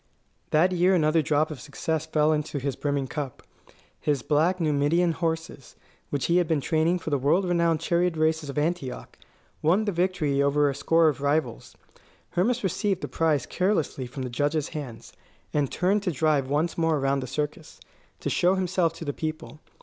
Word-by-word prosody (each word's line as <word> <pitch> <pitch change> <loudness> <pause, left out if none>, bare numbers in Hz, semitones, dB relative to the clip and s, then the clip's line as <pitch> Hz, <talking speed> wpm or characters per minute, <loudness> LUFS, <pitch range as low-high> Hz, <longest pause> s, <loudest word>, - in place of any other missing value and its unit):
That 170 +5 +3
year 180 +1 +3
another 160 -1 +3
drop 155 +1 +1
of 150 - -7
success 155 +2 -3
fell 155 0 +2
into 150 -1 -2
his 140 0 -2
brimming 140 -2 -1
cup. 140 -1 -6 0.6
His 145 -4 -1
black 165 +5 +2
Numidian 160 +2 +2
horses, 165 -4 -4 0.3
which 140 -2 -1
he 170 - +3
had 175 -2 +2
been 160 -2 +1
training 160 +5 +1
for 160 -2 -6
the 145 - +1
world 160 +8 +2
renowned 170 -3 +1
chariot 170 0 +1
races 155 -1 +1
of 140 - -6
Antioch, 150 -4 -2 0.5
won 185 +8 +3
the 205 - 0
victory 170 -6 0
over 140 0 +3
a - - -5
score 165 +4 +3
of 145 -3 0
rivals. 145 - -1 0.6
Hermas 230 +7 +1
received 195 +1 0
the - - -3
prize 155 -5 +1
carelessly 180 -9 -1
from 135 +2 -6
the 125 - -5
judge's 145 +4 0
hands, 135 -7 -8 0.4
and 145 -3 0
turned 195 +3 +1
to 190 -3 -1
drive 150 -3 +1
once 155 +4 0
more 165 -1 +2
around 135 0 +1
the 130 - -5
circus, 150 +3 -5 0.4
to - - -2
show 180 +2 +3
himself 180 -3 0
to 165 - -8
the 145 - -2
people. 155 -4 -5
155 Hz, 180 wpm, -26 LUFS, 145-170 Hz, 0.6 s, That